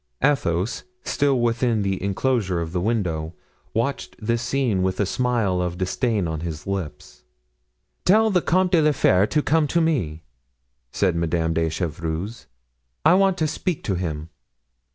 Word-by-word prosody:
Athos, 100 - +1 0.2
still 140 -3 +1
within 120 -2 +1
the 95 -1 -1
inclosure 100 -2 0
of 80 -1 -4
the 90 0 -1
window, 90 -7 -1 0.4
watched 120 +5 -2
this 115 +1 -1
scene 120 -6 0
with 95 0 -1
a 100 - +3
smile 110 -5 0
of 90 -1 -2
disdain 100 +1 0
on 80 -1 -3
his 80 -2 -5
lips. 95 -6 -5 0.8
"Tell 220 +4 +4
the 180 -2 +3
Comte 185 +2 +2
de 170 -4 +5
la 150 -1 +3
Fere 100 -6 +3
to 150 +4 +1
come 155 -1 +2
to 170 - +1
me," 110 - 0 0.7
said 95 -4 +1
Madame 85 0 0
de 80 0 +1
Chevreuse, 85 +5 -4 0.6
"I 160 - +7
want 195 0 +3
to 155 - +1
speak 165 +1 -3
to 100 - -1
him." 80 -3 -3
100 Hz, 155 wpm, -23 LUFS, 85-140 Hz, 0.8 s, I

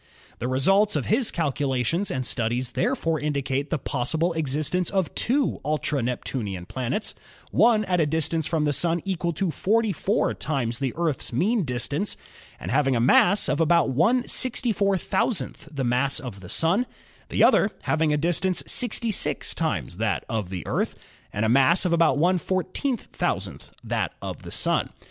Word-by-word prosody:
The 120 - -2
results 195 +11 +3
of - - -1
his 230 +2 +1
calculations 145 - -1
and 130 -1 -2
studies 120 +1 -1
therefore 165 -11 0
indi 145 -2 -1
cate 135 +2 -2
the 165 - 0
possible 155 +6 -1
existence 155 +3 -1
of 190 -5 -1
two 270 +3 0
ultra 150 -2 -1
Neptunian 115 -6 -3
planets, 130 - -2 0.4
one 220 -2 +4
at 180 -2 0
a 155 - +2
distance 160 +1 0
from 160 -2 0
the 145 - +1
Sun 170 +4 +2
equal 180 -3 -1
to 175 +2 -1
44 215 +2 +1
times 125 -6 -2
the 135 -3 -1
Earth's 165 -5 -1
mean 200 - +1
distance 140 - -2 0.4
and - - -5
having 135 -1 +2
a - - +1
mass 175 - +5
about 165 -1 +2
stitcrf 220 - 0
the 140 -3 -3
mass 125 +3 +2
of 120 -7 -8
the 90 -2 -11
Sun, 190 +10 +3 0.4
the - - +2
other - - +5
having 160 -1 +1
a 150 - +2
distance 175 +4 0
66 230 -3 0
times 85 - -2
that 110 -1 -1
of 110 -5 -3
the 90 -4 -5
Earth - - -1 0.4
and 105 +2 -1
a - - +2
mass 135 +10 +4
about 165 -5 +3
TH5W 185 - -1
that - - -2
of - - -6
the - - -10
Sun. - - 0
160 Hz, 155 wpm, -25 LUFS, 130-190 Hz, 0.4 s, mass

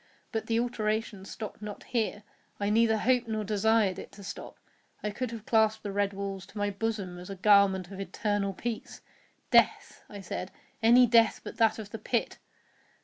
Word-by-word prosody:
But 220 -2 -3
the 230 0 +2
alteration 215 -4 -2
stopped 215 +1 -7
not 210 -1 -7
here—I 210 -3 -3
neither 220 0 +4
hoped 245 +2 +2
nor 220 -1 -2
desired 210 -1 +2
it - - -9
to 200 - -12
stop. 195 - -8 0.5
I 210 - -1
could 250 +4 -3
have 225 -2 -8
clasped 220 -1 +2
the 205 - -3
red 200 0 +1
walls 195 -1 -5
to - - -13
my 205 0 0
bosom 200 -4 -3
as 180 - -10
a 195 - -5
garment 195 -1 +4
of 195 - -8
eternal 205 0 -1
peace. 230 +3 -5 0.5
"Death," - - +3
I 205 -1 -8
said, 185 0 -5 0.3
"any 240 +3 +7
death 230 -2 +4
but - - -8
that 220 -1 +3
of 210 -2 -8
the 225 - -6
pit!" 235 +3 -1
210 Hz, 180 wpm, -29 LUFS, 200-225 Hz, 0.5 s, any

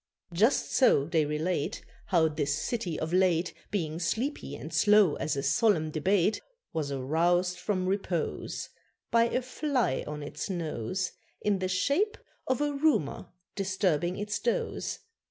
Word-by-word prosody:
Just 220 +10 +2
so 195 - +4
they 160 -1 +2
relate 150 +1 -2 0.2
How 170 -4 +4
this 145 -2 -1
city 190 -1 -2
of 160 +2 -3
late, 180 -2 +2 0.2
Being 165 -5 -2
sleepy 220 - -2
and 155 +3 -8
slow 205 +1 +5
as 155 - -1
a 140 - -1
solemn 155 +1 +2
debate, 190 +6 +2 0.3
Was 155 -3 -2
aroused 175 +7 +1
from 185 0 -1
repose 190 -3 -2 0.4
By 230 0 +5
a 250 +2 -1
fly 255 - 0
on 150 0 -5
its 145 - -5
nose, 170 - -2 0.3
In 205 -2 +1
the 185 - -1
shape 280 - +1 0.3
of 260 +2 +1
a 295 0 +1
rumour 280 - +1 0.3
disturbing 185 -3 0
its 205 0 -2
doze. 240 - -1
180 Hz, 140 wpm, -29 LUFS, 155-210 Hz, 0.4 s, slow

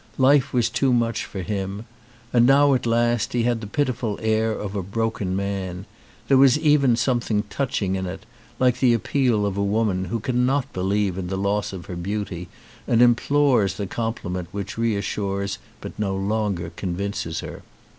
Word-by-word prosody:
Life 135 0 +4
was 120 -2 +2
too 135 -2 +1
much 115 -1 0
for 95 - -6
him. 100 +1 -4 0.5
And 120 0 +5
now 140 +1 +5
at 125 -2 0
last 120 0 +1
he 120 -1 +1
had 120 -1 0
the 105 - -6
pitiful 125 -3 -1
air 110 0 +1
of 105 -2 -4
a 100 - -1
broken 105 -1 -2
man; 95 -2 -3 0.4
there 135 -1 +5
was 135 0 +6
even 145 -5 +4
something 115 -3 0
touching 105 -8 -1
in 95 -1 -3
it, 90 - -7 0.3
like 125 -1 +2
the 125 -3 +4
appeal 115 -2 +1
of 100 -1 -2
a 100 - +1
woman 100 -2 0
who 115 +6 -2
cannot 125 +4 0
be 90 - -3
lieve 95 -1 0
in 90 - -4
the 95 +1 -3
loss 100 +2 0
of 95 -3 -8
her 90 - -6
beauty 90 -1 -4 0.4
and 115 - +3
implores 120 -3 +3
the 100 - -3
compliment 95 -5 -3
which 100 0 -5
reassures 100 -3 -2 0.2
but - - -8
no 100 -2 -1
longer 100 -4 -1
con 90 -1 -3
vinces 95 -4 -3
her. - - -8
105 Hz, 180 wpm, -23 LUFS, 95-120 Hz, 0.5 s, was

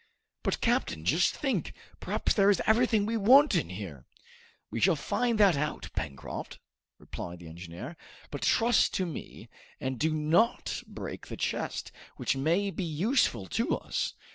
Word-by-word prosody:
"But, - - -1
captain, 80 +1 0
just 165 - +3
think! 275 -3 -2 0.2
Perhaps - - 0
there 200 -1 +4
is 200 - +4
everything 220 -2 +3
we 225 +2 0
want 265 +7 +6
in 175 - +1
there!" 90 - -8 0.6
"We 115 - -2
shall 185 +4 +4
find 230 - 0
that 195 -5 +6
out, 150 +2 -3
Pencroft," 70 -2 -5 0.4
replied 85 0 -7
the 85 -1 -11
engineer; 85 - -8 0.4
"but - - -5
trust 235 +1 +3
to 185 - +1
me, 165 - -8 0.3
and 130 -2 -3
do 160 +1 +2
not 155 +10 +1
break - - -7
the - - -7
chest, - - -3 0.3
which 150 - 0
may 170 +9 +1
be 190 - -4
useful 165 - +1
to - - 0
us. - - -3
165 Hz, 155 wpm, -29 LUFS, -, 0.6 s, want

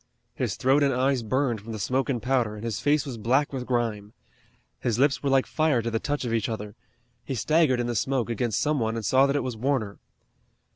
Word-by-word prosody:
His - - -2
throat 135 +3 +3
and 140 -1 +3
eyes 130 0 +1
burned 120 -1 0
from 115 +2 -8
the 110 - -5
smoke 130 +7 0
and 125 -3 0
powder, 125 -4 0
and 105 - -9
his 115 -3 -3
face 145 0 +2
was 125 -5 -6
black 130 +7 +1
with 125 -2 -4
grime. 115 -4 -2 0.7
His 115 -3 -1
lips 140 +2 +2
were 140 - 0
like 135 -1 +3
fire 155 -7 +1
to 115 - -2
the 115 - 0
touch 145 +1 -2
of 115 - -2
each 115 -1 0
other. 105 -2 -5 0.5
He 135 - -4
staggered 150 0 +2
in 120 - 0
the 120 - -2
smoke 130 +2 0
against 115 -1 -1
some 150 -1 +1
one 110 -1 -1
and 115 -2 -4
saw 135 +5 +4
that 140 - 0
it 145 - 0
was 125 -3 -4
Warner. 115 -4 -1
125 Hz, 235 wpm, -26 LUFS, 115-135 Hz, 0.7 s, saw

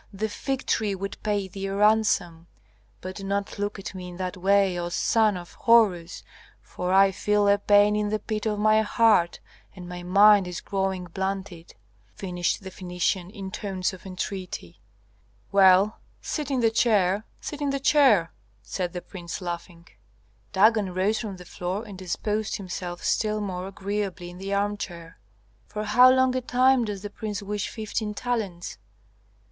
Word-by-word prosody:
the 215 +2 -3
fig 270 +5 -3
tree 210 -3 0
would 195 +1 -5
pay 205 -2 -1
thee 195 +1 -5
a 195 - -3
ransom. 200 -6 +2 0.5
But 185 +1 -7
do 195 - -7
not 200 +1 -3
look 205 0 -2
at 195 - -7
me 185 -1 -7
in 175 - -10
that 185 -1 -3
way, 195 0 +3
O 175 0 -3
son 215 +2 +2
of 175 -1 -10
Horus, 195 -7 +3 0.4
for 180 0 -5
I 195 +1 +6
feel 210 +1 +1
a 200 0 +4
pain 205 +1 +4
in 210 0 0
the 215 - 0
pit 215 0 -3
of 210 -1 -1
my 215 +1 +4
heart 215 -5 +3 0.4
and 180 -2 -9
my 175 0 -7
mind 200 +2 +5
is 180 -1 -5
growing 190 -2 -2
blunted," 190 -1 -5 0.4
finished 180 0 -2
the 190 - -7
Phœnician, 180 0 -2
in 195 -2 -8
tones 190 -2 -2
of 185 +1 -11
entreaty. 185 - -6 0.7
"Well, 195 +1 +5 0.2
sit 300 -3 -4
in 265 -3 0
the 225 -1 +3
chair, 210 -4 +2 0.2
sit 295 -1 -7
in 285 - 0
the 275 0 -1
chair," 265 - +4 0.3
said 180 - -4
the 180 - -5
prince, 175 -4 -7
laughing. 170 -1 -7 0.6
Dagon 205 -2 +3
rose 205 +4 +1
from 205 -4 -5
the 180 - -12
floor 180 +5 -4
and 205 -3 -9
disposed 210 +4 -2
himself 180 -3 -6
still 215 -1 0
more 185 -3 -4
agreeably 195 -2 -4
in 180 - -12
the 195 +1 -5
armchair. 200 -5 -3 0.5
"For 210 - -4
how 245 +5 +6
long 260 0 +3
a 255 - 0
time 255 0 +3
does 205 -2 -5
the 205 - -6
prince 210 -1 -5
wish 205 0 -3
fifteen 215 -1 -4
talents?" 205 - -3
200 Hz, 170 wpm, -25 LUFS, 180-215 Hz, 0.7 s, I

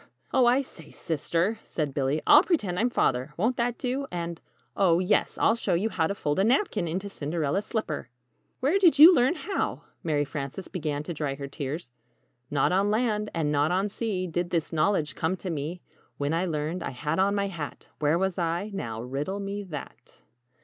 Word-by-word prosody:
"Oh, 255 -3 +5
I 255 +3 +4
say, 160 - -13
Sister," 170 +7 -1
said 150 -4 -3
Billy; 140 +2 0
"I'll 295 - +8
pretend 210 - 0
I'm 240 +3 +2
Father 135 - 0
won't 225 +8 +1
that 240 0 0
do? 265 +2 -2
And 170 -1 -4 0.3
oh, 175 -4 +4
yes! 185 +3 +1
I'll - - +4
show 230 - 0
you 205 +6 +1
how 160 -6 +1
to 200 - -3
fold 145 -2 -1
a - - +4
napkin 225 - +2
into 185 +5 -3
'Cinderella's 160 +2 -2
slipper!'" 160 - -3 0.5
"Where 300 +10 +3
did 345 -6 +5
you 320 +5 +11
learn 260 +2 +3
how?" 390 +2 -3 0.2
Mary 150 -3 +1
Frances 145 +5 -5
began 150 -4 -3
to 170 - -5
dry 145 -3 -2
her 140 0 -6
tears. 140 +1 -5 0.6
"Not 145 +2 +2
on 195 +3 +2
land, 215 -1 0
and 155 -3 0
not 145 +1 +2
on 190 +3 +1
sea 205 -3 -2
Did 175 0 -2
this 165 -1 -1
knowledge 155 -2 +1
come 175 +4 -1
to 185 -1 -5
me. 160 +3 -4 0.4
When 145 +2 -1
I 175 +3 +1
learned, 155 +2 -2
I - - -3
had 150 +7 -2
on 200 +1 +3
my 200 -1 +1
hat 160 -6 -7
Where 150 +2 +2
was 190 0 -1
I? 175 +5 -1
Now, 115 - -4
riddle 145 +10 -3
me 200 +1 -4
that? 155 -6 -10
175 Hz, 195 wpm, -27 LUFS, 150-210 Hz, 0.6 s, you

